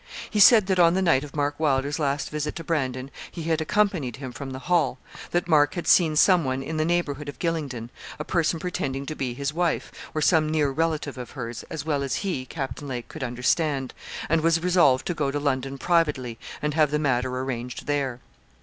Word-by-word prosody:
He 210 - -2
said 210 0 +8
that 190 -1 +1
on 170 0 +6
the 190 - +2
night 155 -6 +3
of 145 -1 -10
Mark 145 0 -1
Wylder's 145 0 +1
last 140 -1 -1
visit 150 0 -3
to 165 - -6
Brandon, 135 -5 -2 0.2
he 165 - -7
had 160 -1 0
accompanied 170 - +1
him 130 -1 -7
from 135 +2 -7
the 130 - -6
Hall; 165 -8 +2 0.3
that 175 0 0
Mark 145 -3 +4
had 175 - -3
seen 160 -4 +5
some 180 +2 +5
one 130 0 -2
in 155 +3 -4
the 155 - +1
neighbourhood 150 -4 -1
of 145 - -8
Gylingden, 140 -9 -3 0.3
a 150 - -4
person 165 0 0
pretending 140 -6 -3
to 155 - -5
be 125 -4 -3
his 140 +2 -2
wife, 170 0 0 0.2
or 155 - 0
some 155 -2 +4
near 150 -3 +1
relative 155 -3 -1
of 125 - -7
hers, 115 -2 -5
as 155 -3 -5
well 145 -3 0
as 135 -1 -1
he, 135 -10 -2
Captain 140 -1 -5
Lake, 125 -3 -5
could - - -7
understand, 130 +3 0 0.3
and 165 +1 +2
was 165 +1 +2
resolved 170 -8 +4
to 175 - -1
go 150 -4 -1
to 145 +1 -2
London 135 -1 -1
privately, 145 -9 +1 0.2
and 150 0 0
have 155 -1 +3
the 150 - +1
matter 130 -4 +1
arranged 125 -2 -4
there. 135 -4 -1
145 Hz, 215 wpm, -25 LUFS, 135-165 Hz, 0.3 s, said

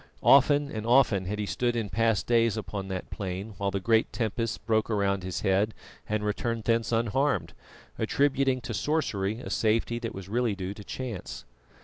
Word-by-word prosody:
Often 145 +1 +5
and 110 -1 -4
often 115 -5 +4
had 105 +2 -2
he 105 - -2
stood 120 +3 -1
in 110 -4 -2
past 115 -1 +1
days 115 -2 +3
upon 100 -2 -4
that 95 -1 -5
plain 95 +2 -5
while 100 -1 0
the 100 0 -2
great 110 +3 +2
tempests 115 0 -2
broke 110 0 0
around 100 -2 +1
his 90 0 -4
head, 100 +2 +1 0.3
and 105 0 -1
returned 115 +2 -2
thence 115 +1 +1
unharmed, 120 +5 +1 0.5
attributing 135 -2 +1
to 115 - -5
sorcery 110 -4 -1
a - - -7
safety 115 +2 +1
that 115 -1 -5
was 95 -1 -8
really 115 0 0
due 95 0 -4
to 105 - -11
chance. 95 - -6
110 Hz, 175 wpm, -28 LUFS, 100-120 Hz, 0.5 s, Often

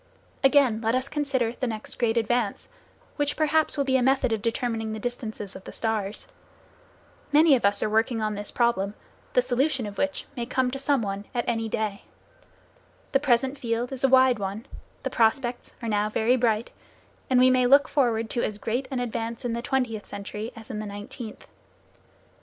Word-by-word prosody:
Again, 270 -5 +4
let 225 +1 +1
us 255 +1 -1
consider 275 -6 0
the 255 +1 -3
next 220 -2 -5
great 235 -1 +2
advance, 230 -1 0 0.5
which 290 -1 0
perhaps 310 0 +2
will 280 - +2
be 265 -1 +2
a - - +1
method 265 -2 +2
of 220 - -1
determining 225 -1 -1
the 220 - -5
distances 220 -4 -5
of 190 - -9
the - - -9
stars. 215 -2 -2 1.1
Many 300 0 +6
of 240 - 0
us 200 0 +2
are - - 0
working 225 +2 +2
on 215 -1 -1
this 205 0 -4
problem, 210 -4 +1 0.4
the 250 - +4
solution 255 0 0
of 205 -1 -7
which 285 0 -1
may 235 -1 -3
come 255 0 +1
to 270 - -4
some 275 -3 +1
one 200 0 -4
any 225 -2 -1
day. 215 -2 -2 1.1
The 270 - +4
present 265 0 +1
field 235 +1 -2
is 265 -1 -4
a 270 - +5
wide 260 -3 +5
one, 200 +4 -4 0.4
the - - -2
prospects 240 +2 +1
are - - -2
now 210 0 +1
very 225 +3 +2
bright, 230 -2 +1 0.6
and 255 -1 +4
we 255 0 +6
may 255 -1 +4
look 280 +3 +6
forward 235 -5 +1
to 240 - 0
as 210 - -2
great 240 +5 -2
an 265 -3 -2
advance 230 -1 -3
in 235 - -1
the 235 - -2
twentieth 245 -5 -1
century, 210 +3 -6
as 225 +2 -10
in 210 - -4
the 215 - -4
nineteenth. 205 +2 -8
235 Hz, 190 wpm, -26 LUFS, 220-260 Hz, 1.1 s, Many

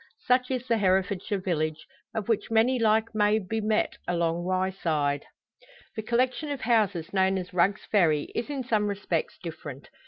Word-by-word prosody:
Such 250 0 +3
is 255 -1 -2
the 230 -3 +1
Herefordshire 190 +1 +1
village, 160 -4 -2 0.3
of 220 -1 -2
which 225 -3 0
many 230 +3 +3
like 220 0 +2
may 210 0 +3
be 220 +2 -2
met 215 0 0
along 170 0 0
Wyeside. 170 -6 0 0.7
The 220 - -2
collection 255 +6 0
of 285 -3 -3
houses 200 -7 +1
known 190 0 +3
as 180 -1 -6
Rugg's 185 +3 +2
Ferry 160 -8 +2
is 235 - -3
in 280 -3 -3
some 215 -4 +1
respects 205 - -2
different. - - -8
205 Hz, 160 wpm, -27 LUFS, 180-230 Hz, 0.7 s, Such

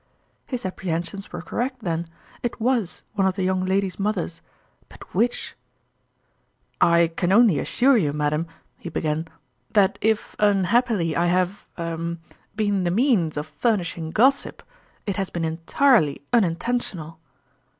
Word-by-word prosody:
" - - -42
His 250 -6 -4
apprehensions 185 +1 -4
were 175 - -6
correct 250 +3 -3
then: 170 -1 -2 0.3
it 240 - -3
was 230 -5 0
one 195 -3 +2
of 185 - 0
the 195 - -1
young 185 0 +1
ladies' 190 0 0
mothers 195 -5 -2 0.5
but - - -14
which 240 +1 0
f - - -27 0.6
" - - -44
I 170 0 +5
can 175 +1 0
only 205 -6 +5
assure 260 +1 +3
you, 155 -9 +1
madam," 150 +2 -1 0.3
he 170 - -6
began, 160 0 -2 0.2
" 120 0 -41
that 200 -2 +4
if 220 0 0
unhappily 205 -3 +2
I 170 +1 +2
have 185 +2 0
er 170 0 -3 0.4
been 205 -3 +1
the 175 - +1
means 190 - +2
of 150 +1 -5
furnishing 175 -8 0
gossip, 260 +11 +2 0.4
it 200 -1 -2
has 195 -2 -1
been 170 -1 -2
entirely 165 - +2
unin 190 -9 +4
tentional." 175 -7 -3
185 Hz, 150 wpm, -24 LUFS, 165-220 Hz, 0.6 s, I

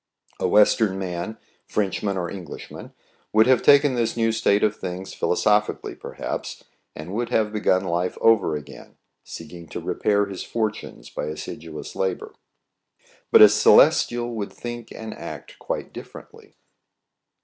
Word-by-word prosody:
A - - +1
Western 105 -1 +4
man, 95 +3 -4 0.3
Frenchman 100 -1 -1
or 90 -2 -2
Englishman, 90 -4 -9 0.4
would 110 +1 +5
have 130 -2 +4
taken 145 -1 +5
this 120 -1 -1
new 115 -1 +2
state 105 -2 +2
of 105 -1 +2
things 95 -1 -6
philo - - 0
sophically 105 +2 +1
perhaps, - - -6 0.3
and 80 +5 -8
would 115 +2 -2
have 110 -3 +1
begun 95 -3 +2
life 90 0 -2
over 105 -8 +3
again, 75 -2 -10 0.3
seeking 85 -2 -10
to - - -5
repair 105 -1 0
his 100 -2 -7
fortunes 110 -2 -4
by - - -4
assiduous 75 +1 -7
labor; 95 -2 -2 1.0
but - - +9
a - - +12
Celestial 120 +3 +4
would 105 -3 -4
think 120 -1 -8
and 110 -1 -7
act - - -9
quite - - -5
difFerently. - - -12
105 Hz, 140 wpm, -23 LUFS, 90-110 Hz, 1.0 s, a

